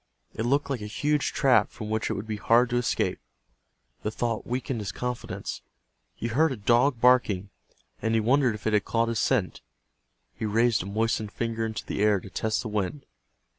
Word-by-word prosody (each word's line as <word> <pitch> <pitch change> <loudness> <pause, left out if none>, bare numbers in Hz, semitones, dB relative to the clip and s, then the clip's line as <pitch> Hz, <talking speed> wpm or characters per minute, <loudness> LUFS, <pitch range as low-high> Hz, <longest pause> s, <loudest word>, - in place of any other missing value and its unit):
It 110 +2 -2
looked 140 +2 +1
like 130 -5 -2
a 105 - -5
huge 145 +8 0
trap 130 -2 +3
from 110 -1 -7
which 110 0 0
it - - 0
would 100 - -5
be 110 -1 -4
hard 120 +3 +3
to 120 - +2
escape. 120 - 0 0.8
The - - -1
thought 115 0 -2
weakened 125 0 -2
his 100 -2 -4
confidence. 125 +4 -5 0.5
He - - -6
heard 150 +7 +3
a 130 - -3
dog 120 +5 +3
barking, 110 -6 +3 0.5
and 115 0 +1
he - - +4
wondered 125 +1 +3
if 105 - -11
it 110 - +1
had 105 - +3
caught 115 0 0
his 115 -2 -1
scent. 115 -9 0 0.7
He - - -8
raised 115 +1 +2
a 90 - -6
moistened 110 0 -1
finger 115 0 -2
into 110 +2 -5
the - - -3
air 105 -2 +4
to 95 - -12
test 110 +6 -1
the - - -4
wind. 105 +7 -3
115 Hz, 200 wpm, -27 LUFS, 105-125 Hz, 0.8 s, he